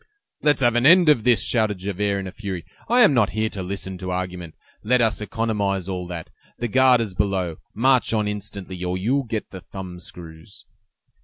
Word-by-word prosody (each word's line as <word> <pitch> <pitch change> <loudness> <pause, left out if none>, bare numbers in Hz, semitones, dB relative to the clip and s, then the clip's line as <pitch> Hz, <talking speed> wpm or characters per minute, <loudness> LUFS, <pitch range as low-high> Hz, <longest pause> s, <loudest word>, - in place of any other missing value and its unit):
"Let's 150 -2 +2
have 120 -1 +3
an 120 +3 +4
end 170 0 +7
of 125 -7 +3
this!" 120 -2 +4
shouted 110 -4 +1
Javert, 100 +1 -1
in - - -7
a 95 - -6
fury; 95 -5 -6 0.2
"I 245 +2 +5
am 210 -11 +6
not 120 -6 +2
here 110 0 +1
to 95 - -5
listen 95 0 -5
to 95 0 -5
argument. 90 -2 -4 0.3
Let 125 +4 +3
us 110 -2 +1
economize 105 -4 -1
all 90 -2 -4
that; 85 -2 -7 0.3
the 120 - -2
guard 130 +1 +4
is 105 -5 -3
below; 95 -3 -1 0.2
march 130 +2 +3
on 105 -2 +1
instantly, 100 -3 -6
or 90 0 -1
you'll 130 +8 0
get 110 -2 -4
the 95 - -8
thumb 90 0 -8
screws!" 90 +4 -12
100 Hz, 200 wpm, -23 LUFS, 90-120 Hz, 0.3 s, end